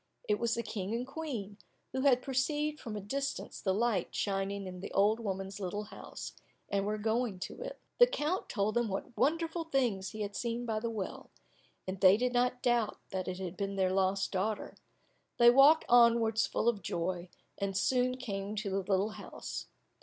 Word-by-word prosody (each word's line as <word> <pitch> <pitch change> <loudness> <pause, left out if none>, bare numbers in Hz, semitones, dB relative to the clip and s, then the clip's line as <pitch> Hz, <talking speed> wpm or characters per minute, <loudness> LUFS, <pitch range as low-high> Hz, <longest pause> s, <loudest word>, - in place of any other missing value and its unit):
It 420 -2 +2
was 235 -1 +1
the 235 - -2
King 215 -1 -3
and 240 +2 -2
Queen, 260 -9 -5 0.3
who 260 - -1
had 255 -2 +4
perceived 295 +3 0
from 220 -2 -6
a - - -4
distance 275 +8 -3
the 190 - +1
light 210 -2 0
shining 195 0 -1
in 180 -1 -7
the 190 - -7
old 210 +3 +4
woman's 195 -2 -4
little 205 +2 -3
house, 210 - -8 0.4
and 200 0 0
were 215 0 0
going 220 -1 0
to - - -6
it. - - -6 0.2
The 485 - +9
count 370 -7 -1
told 205 0 0
them 240 -1 +1
what 195 +3 -4
wonderful 330 +2 +1
things 245 -11 0
he 215 - -7
had 205 -1 -3
seen 235 +2 -2
by 220 -2 -1
the 230 +1 -2
well, 210 -4 -5 0.6
and 185 0 -4
they 190 +1 +8
did 250 +2 0
not 250 0 +1
doubt 240 -3 +2
that 185 -1 -3
it 180 - -3
had 185 -1 -5
been 200 +1 -3
their 185 -1 +2
lost 190 0 +1
daughter. 205 +3 -2 0.6
They 240 0 +8
walked 280 +5 +7
onwards 235 -2 +5
full - - -1
of 225 -4 +2
joy, 175 +1 -2 0.3
and 195 -1 -1
soon 255 +3 +2
came 205 -4 -4
to 210 -2 -2
the 195 - +1
little 195 +2 +1
house. - - -7
215 Hz, 190 wpm, -32 LUFS, 195-250 Hz, 0.6 s, The